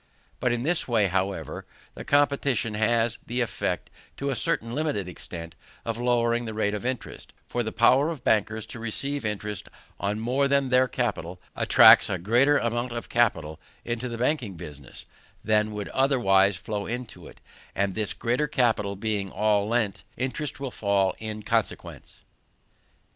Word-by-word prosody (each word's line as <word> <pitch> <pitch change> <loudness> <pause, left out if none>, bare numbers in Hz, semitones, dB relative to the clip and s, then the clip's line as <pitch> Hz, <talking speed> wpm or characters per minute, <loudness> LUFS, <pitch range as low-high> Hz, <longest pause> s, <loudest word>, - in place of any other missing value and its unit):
Even 125 -1 +2
in 120 0 -2
this 165 +4 +1
way, 115 -4 +3
however, 95 +1 -2 0.3
the - - -8
competition 140 -5 +1
has 115 +1 +1
the 120 +2 -3
effect, 120 -5 -2 0.3
to 140 0 -2
a - - -1
certain 115 +1 -1
limited 145 - -1
extent, 85 -1 -8 0.3
of 115 0 -3
lowering 120 -1 +1
the 110 -1 -5
rate 105 -1 0
of 105 - -4
interest; 130 -2 -5
for 120 - -1
the 110 -1 -3
power 130 +6 +4
of 160 -5 -6
bankers 110 0 +1
to - - -9
receive 140 +5 -3
interest 105 -2 -4 0.3
on 105 +2 -1
more 130 +5 +1
than 140 -1 +2
their 130 0 +4
capital 100 -9 -3 0.2
attracts - - +7
a 95 - 0
greater 120 +11 +3
amount 120 0 -1
of 120 - -6
capital 80 -10 +1 0.3
into 120 +1 -3
the 115 - -5
banking 125 - -1
business 75 -4 -10 0.4
than 105 0 +2
would 105 -1 -5
otherwise 105 -8 +3
flow 100 +2 -4
into 120 0 -6
it; - - -15 0.4
and 100 -1 0
this 105 0 -1
greater 125 +6 0
capital 110 -7 +1
being 100 -1 -2
all 105 0 +1
lent, 110 -3 0
interest 135 +4 -3
will 135 -2 -4
fall 100 -3 +1
in 110 -1 -6
consequence. 115 -1 -3
115 Hz, 160 wpm, -26 LUFS, 105-125 Hz, 0.4 s, attracts